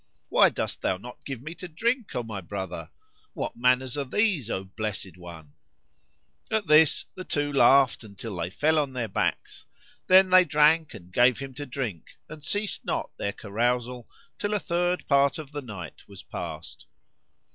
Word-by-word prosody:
Why - - +6
dost - - -4
thou 95 - 0
not 120 +6 -11
give 135 -3 -6
me 155 +3 -6
to 175 +2 -8
drink, 230 - -1
O 125 - -1
my 110 -4 -6
brother? 90 -3 -6 0.4
What - - -4
manners 125 +2 +2
are - - 0
these, 160 - +1
O 95 - -2
blessed 95 -2 -5
one?" 85 -4 -12 1.0
At 220 -2 0
this 155 -1 +5
the 185 - -7
two 145 -4 -1
laughed 135 -2 +5
until 105 0 -8
they 85 0 -2
fell 155 +10 +2
on 140 -3 -1
their 120 -3 -2
backs; 95 - -2 0.4
then 185 0 +6
they 185 0 +8
drank 150 -2 +3
and 90 -3 -13
gave 125 +3 +5
him 135 -1 -7
to 145 +3 -7
drink 120 - -5
and 155 -1 -11
ceased 205 +5 -1
not - - -2
their 100 - -2
carousal 120 +3 -2 0.3
till 205 +1 -1
a - - +1
third 175 0 -1
part 140 -1 +3
of 150 -3 -8
the 145 -1 -5
night 100 - -9
was - - -12
past. - - -7
130 Hz, 175 wpm, -27 LUFS, 105-155 Hz, 1.0 s, they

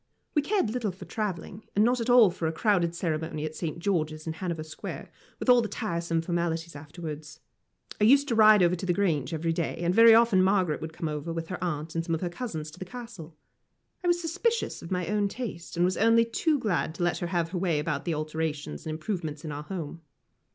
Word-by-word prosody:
We 295 - +3
cared 375 - 0
little 230 -4 -1
for 185 - -11
travelling, 200 -1 -4
and 210 +2 +5
not 245 0 +2
at 230 - -2
all 240 -6 +7
for 165 -1 -3
a - - 0
crowded 175 -2 +1
ceremony 160 -2 -2
at 155 - -4
St. 165 -3 -4
George's 155 -4 -1
in 160 - -3
Hanover 165 -1 -4
Square, 155 0 -8 0.3
with - - -5
all 245 -1 +7
the 225 - -2
tiresome 170 -6 -2
formalities 170 -1 -2
afterwards. 150 +1 -8 0.6
I - - +6
used 280 +5 +6
to - - +1
ride 215 -3 +7
over 175 +1 +3
to 180 - -5
the 175 - +2
Grange 155 -9 0
every 165 0 -1
day, 165 0 -2
and 175 +1 0
very 230 +2 +8
often 230 -5 +5
Margaret 185 -4 +2
would 160 - -5
come 155 -3 -4
with 165 -1 -4
her 180 -1 -4
aunt 160 -2 -3
and 165 - -1
some 165 -1 -1
of 160 - -5
her 180 - -1
cousins 170 -7 -5
to 160 - -14
the - - -4
Castle. 195 -8 -10 0.7
I - - -1
was 345 0 +3
suspicious 450 +8 -1
of 165 - -9
my 180 -2 -1
own 205 +3 +1
taste, 195 -6 -6
and 175 - +4
was 185 - 0
only 230 +1 +5
too 300 +6 +1
glad 180 - -1
to - - -2
let 175 - +1
her 175 - -2
have 170 -2 -1
her 180 - -2
way 170 -4 +1
about 150 - -2
the 170 -3 0
alterations 155 - -4
and - - -2
improvements 155 -2 -4
in 155 - -4
our 145 0 -5
home. 165 -1 -6
175 Hz, 230 wpm, -28 LUFS, 160-215 Hz, 0.7 s, very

